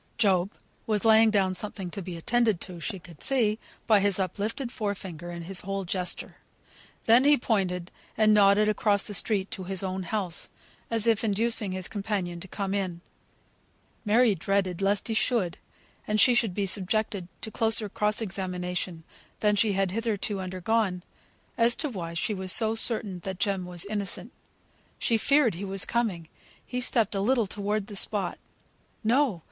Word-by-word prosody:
Job 195 Hz, -4 st, +2 dB, 0.4 s
was 215 Hz, -1 st, 0 dB
laying 220 Hz, 0 st, +6 dB
down 195 Hz, -3 st, +2 dB
something 190 Hz, -2 st, -4 dB
to 200 Hz, -, -5 dB
be 180 Hz, -2 st, -6 dB
attended 225 Hz, +2 st, +1 dB
to 180 Hz, -2 st, -7 dB
she 195 Hz, +5 st, -4 dB
could 170 Hz, -4 st, -15 dB
see, 225 Hz, -5 st, +2 dB, 0.3 s
by 215 Hz, -2 st, +5 dB
his 200 Hz, -1 st, +1 dB
up 190 Hz, 0 st, -3 dB
lifted 230 Hz, +4 st, -3 dB
fore 205 Hz, -4 st, -2 dB
finger, 175 Hz, -3 st, -8 dB
and 170 Hz, -1 st, -7 dB
his 190 Hz, 0 st, +2 dB
whole 195 Hz, 0 st, -4 dB
gesture; 180 Hz, 0 st, -2 dB, 0.7 s
then 235 Hz, +3 st, +5 dB
he 290 Hz, +1 st, +5 dB
pointed 185 Hz, -6 st, -1 dB, 0.3 s
and 215 Hz, -1 st, +5 dB
nodded 205 Hz, 0 st, +5 dB
across 210 Hz, -1 st, +2 dB
the 210 Hz, -, -3 dB
street 200 Hz, -1 st, +1 dB
to 185 Hz, -, -5 dB
his 190 Hz, 0 st, -4 dB
own 190 Hz, 0 st, -3 dB
house, 185 Hz, -2 st, -2 dB, 0.4 s
as 225 Hz, -1 st, +1 dB
if 225 Hz, -1 st, +2 dB
inducing 220 Hz, -1 st, +1 dB
his 185 Hz, -1 st, -3 dB
companion 195 Hz, -4 st, -3 dB
to 190 Hz, -, -8 dB
come 195 Hz, +1 st, -3 dB
in. 185 Hz, -4 st, -2 dB, 1.0 s
Mary 225 Hz, +1 st, +4 dB
dreaded 195 Hz, 0 st, -1 dB
lest 200 Hz, +1 st, +1 dB
he 225 Hz, -, -1 dB
should, 220 Hz, -6 st, 0 dB, 0.5 s
and 215 Hz, 0 st, +1 dB
she 240 Hz, 0 st, +5 dB
be 200 Hz, +1 st, -2 dB
subjected 195 Hz, 0 st, -1 dB
to -, -, -5 dB
a -, -, -33 dB
closer 225 Hz, -1 st, +4 dB
cross 210 Hz, +2 st, 0 dB
examination 180 Hz, -3 st, -4 dB, 0.4 s
than 210 Hz, -1 st, +2 dB
she 205 Hz, 0 st, +2 dB
had 195 Hz, -1 st, 0 dB
hitherto 215 Hz, -1 st, -2 dB
undergone, 185 Hz, 0 st, -1 dB, 0.6 s
as 230 Hz, 0 st, +5 dB
to 310 Hz, -, -2 dB
why 170 Hz, -, -6 dB
she 190 Hz, +6 st, -1 dB
was 190 Hz, -2 st, -2 dB
so 220 Hz, +1 st, +5 dB
certain 220 Hz, -4 st, +2 dB
that 190 Hz, +1 st, -6 dB
Jem 195 Hz, -3 st, -1 dB
was 175 Hz, 0 st, -2 dB
innocent. 205 Hz, -2 st, -3 dB, 0.7 s
She 230 Hz, -, +1 dB
feared 280 Hz, -3 st, +3 dB
he 175 Hz, +4 st, -7 dB
was 195 Hz, -1 st, +2 dB
coming; 205 Hz, -9 st, -1 dB, 0.4 s
he 250 Hz, 0 st, -4 dB
stepped 230 Hz, -4 st, +1 dB
a 195 Hz, -, -1 dB
little 235 Hz, +2 st, +2 dB
towards 205 Hz, +1 st, -2 dB
the 205 Hz, -1 st, -10 dB
spot. 200 Hz, -1 st, 0 dB, 0.6 s
No! 240 Hz, -3 st, +2 dB
200 Hz, 175 wpm, -27 LUFS, 185-220 Hz, 1.0 s, laying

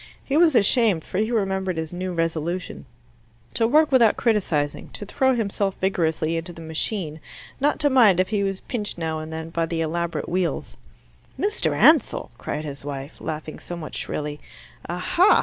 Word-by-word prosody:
He 275 Hz, -, -1 dB
was 320 Hz, -3 st, +5 dB
ashamed, 210 Hz, -5 st, +3 dB
for 185 Hz, -, -3 dB
he 220 Hz, +1 st, +1 dB
remembered 190 Hz, -5 st, 0 dB
his 160 Hz, +1 st, -4 dB
new 185 Hz, +1 st, -3 dB
resolution 165 Hz, -1 st, -2 dB, 0.7 s
to 225 Hz, -, +2 dB
work 305 Hz, +4 st, +4 dB
without 235 Hz, -5 st, +5 dB
criticizing, 175 Hz, -11 st, 0 dB
to 205 Hz, -, -7 dB
throw 265 Hz, +5 st, +2 dB
himself 200 Hz, -3 st, -1 dB
vigorously 165 Hz, -3 st, 0 dB
into 165 Hz, +2 st, -5 dB
the 165 Hz, -, -11 dB
machine, 160 Hz, 0 st, -3 dB, 0.4 s
not 290 Hz, +2 st, +2 dB
to 295 Hz, -, +5 dB
mind 220 Hz, -9 st, +6 dB
if 185 Hz, -, +2 dB
he 210 Hz, -2 st, 0 dB
was 195 Hz, -1 st, -2 dB
pinched 210 Hz, -6 st, -4 dB
now 160 Hz, -2 st, -2 dB
and 155 Hz, 0 st, -7 dB
then 160 Hz, 0 st, -6 dB
by 165 Hz, 0 st, 0 dB
the 165 Hz, 0 st, -2 dB
elaborate 170 Hz, +1 st, -2 dB
wheels. 180 Hz, -1 st, -2 dB, 0.6 s
"Mr. 420 Hz, +2 st, 0 dB
Ansell!" 310 Hz, -6 st, +4 dB
cried 150 Hz, +1 st, -4 dB
his 140 Hz, -2 st, -7 dB
wife, 140 Hz, 0 st, -6 dB
laughing 155 Hz, 0 st, -5 dB
somewhat 170 Hz, -3 st, -7 dB
shrilly. 150 Hz, 0 st, -4 dB, 0.5 s
"Aha! 335 Hz, -, +4 dB
180 Hz, 165 wpm, -24 LUFS, 160-220 Hz, 0.7 s, mind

